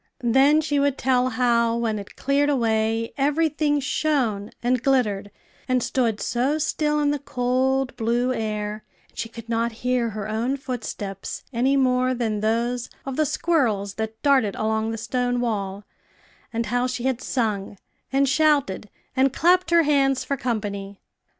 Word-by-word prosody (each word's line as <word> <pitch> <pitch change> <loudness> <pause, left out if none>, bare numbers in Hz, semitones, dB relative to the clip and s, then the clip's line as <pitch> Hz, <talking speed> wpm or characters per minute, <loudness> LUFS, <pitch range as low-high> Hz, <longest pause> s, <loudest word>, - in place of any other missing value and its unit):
Then 270 +6 +5
she 290 -2 0
would 280 -1 +1
tell 255 -1 +2
how, 235 -2 +2
when 225 -2 -1
it 200 - -10
cleared 280 +1 +1
away, 225 -3 0
every 295 +4 +2
thing 295 -1 +1
shone, 255 -8 0
and 250 0 +1
glittered, 215 -7 +1 0.4
and 255 -1 +1
stood 230 -5 0
so 260 +6 0
still 300 -1 0
in 290 -1 +2
the 290 - -1
cold, 260 0 0
blue 240 +2 +1
air, 215 -2 -3 0.3
and - - -30
she 225 - -3
could 230 -1 -10
not 230 0 0
hear 250 -2 +1
her 210 -1 -5
own 230 +5 -1
footsteps 220 -7 -5
any 260 +4 +2
more 255 -1 +2
than 225 -3 -1
those 235 +3 -1 0.2
of 270 -1 -4
the 310 +1 +2
squirrels 225 - 0
that 220 +1 -5
darted 265 -8 +3
along 220 0 0
the 225 - -3
stone 245 +2 -1
wall, 200 -4 -2 0.7
and 230 0 -1
how 245 +3 0
she 250 -1 -4
had 260 -1 0
sung, 210 -7 -2 0.3
and 275 +1 +3
shouted, 280 -9 +2 0.3
and 265 0 +3
clapped 360 +1 +3
her 340 -1 +5
hands 275 -3 +2
for 280 - -1
company. 205 -5 -4
245 Hz, 160 wpm, -24 LUFS, 220-275 Hz, 0.7 s, Then